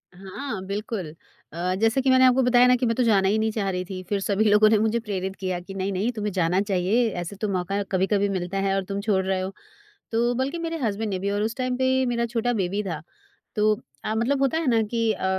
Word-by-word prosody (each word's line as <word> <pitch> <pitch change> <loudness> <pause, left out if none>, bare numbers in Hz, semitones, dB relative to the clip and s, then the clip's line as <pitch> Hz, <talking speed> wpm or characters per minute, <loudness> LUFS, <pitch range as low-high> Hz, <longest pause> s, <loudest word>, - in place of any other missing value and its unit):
हाँ, 195 +4 -6
बिल्कुल। 200 -4 -4 0.4
अ, 175 +2 -1
जैसे 225 +4 +3
कि 265 - +1
मैंने 260 0 +6
आपको 255 +1 +5
बताया 250 0 +5
ना 250 - +5
कि 250 0 -1
मैं 230 -1 +1
तो 250 - +2
जाना 200 -5 +3
ही 205 +3 +2
नहीं 220 0 +1
चाह 210 -3 -1
रही 180 -1 -2
थी। 185 0 -6
फिर 205 - 0
सभी 200 +2 +1
लोगों 210 +1 +6
ने 220 - +4
मुझे 220 +2 +1
प्रेरित 195 -4 -4
किया 185 -2 -3
कि, 180 +2 -10
"नहीं-नहीं 195 +3 -1
तुम्हें 210 -3 -3
जाना 180 +1 +2
चाहिए, 200 +4 +1
ऐसे 180 0 -5
तो 210 +2 -3
मौका 195 +1 -1
कभी-कभी 200 +2 +1
मिलता 185 0 -3
है 195 0 +1
और 195 - 0
तुम 195 - -2
छोड़ 200 -3 +1
रहे 190 0 0
हो।" 190 +1 -4 0.6
तो 235 +2 +1
बल्कि 265 +6 -1
मेरे 330 0 -3
हस्बैंड 215 0 -1
ने 190 -2 -2
भी 200 +2 -2
और 205 0 -1
उस 220 +2 -1
टाइम 255 -1 -1
पे 260 0 +2 0.2
मेरा 235 -1 0
छोटा 235 +1 -1
बेबी 200 -1 -1
था। 165 -6 -4 0.5
तो 215 -1 +2 0.2
अ, 215 - -1
मतलब 260 +5 +1
होता 275 +3 +2
है 325 -3 -1
ना 230 -3 +3
कि 225 +1 0
अ, - - -4
210 Hz, 245 wpm, -24 LUFS, 190-235 Hz, 0.6 s, मैंने